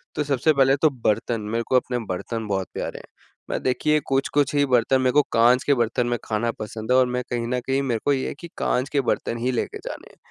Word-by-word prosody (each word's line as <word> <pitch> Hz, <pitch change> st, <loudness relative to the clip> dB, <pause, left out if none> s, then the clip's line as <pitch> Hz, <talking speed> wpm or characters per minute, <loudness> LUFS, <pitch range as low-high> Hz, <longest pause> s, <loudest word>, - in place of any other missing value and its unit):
तो 150 Hz, -, 0 dB
सबसे 145 Hz, +2 st, +2 dB
पहले 135 Hz, -1 st, +4 dB
तो 155 Hz, -, +5 dB
बर्तन, 115 Hz, -3 st, -1 dB
मेरे 115 Hz, +3 st, -2 dB
को -, -, +1 dB
अपने 125 Hz, -1 st, +1 dB
बर्तन 110 Hz, +4 st, -4 dB
बहुत 95 Hz, -2 st, -1 dB
प्यारे -, -, -4 dB
हैं -, -, -14 dB, 0.4 s
मैं -, -, -2 dB
देखिए 150 Hz, +4 st, +2 dB
कुछ-कुछ 135 Hz, +1 st, +1 dB
ही 145 Hz, 0 st, +4 dB
बर्तन 130 Hz, 0 st, +2 dB
मेरे 130 Hz, -1 st, +2 dB
को 150 Hz, -, +6 dB
कांच 120 Hz, +3 st, +4 dB
के 145 Hz, -, +3 dB
बर्तन 120 Hz, 0 st, 0 dB
में 120 Hz, 0 st, 0 dB
खाना 115 Hz, +2 st, -1 dB
पसंद 110 Hz, +2 st, -5 dB
है 130 Hz, -, +5 dB
और 130 Hz, -, +5 dB
मैं 125 Hz, 0 st, -2 dB
कहीं 120 Hz, -1 st, -2 dB
न 125 Hz, +1 st, -1 dB
कहीं 135 Hz, +1 st, +1 dB
मेरे 120 Hz, -4 st, -1 dB
को 145 Hz, -, +4 dB
ये 130 Hz, -1 st, -1 dB
है -, -, -4 dB
कि 170 Hz, -, -8 dB
कांच 130 Hz, +3 st, 0 dB
के 140 Hz, -, +1 dB
बर्तन 115 Hz, -, -1 dB
हीं 125 Hz, +2 st, -1 dB
लेके 120 Hz, -, -2 dB
जाने -, -, -8 dB
हैं। -, -, -24 dB
125 Hz, 250 wpm, -23 LUFS, 115-135 Hz, 0.4 s, को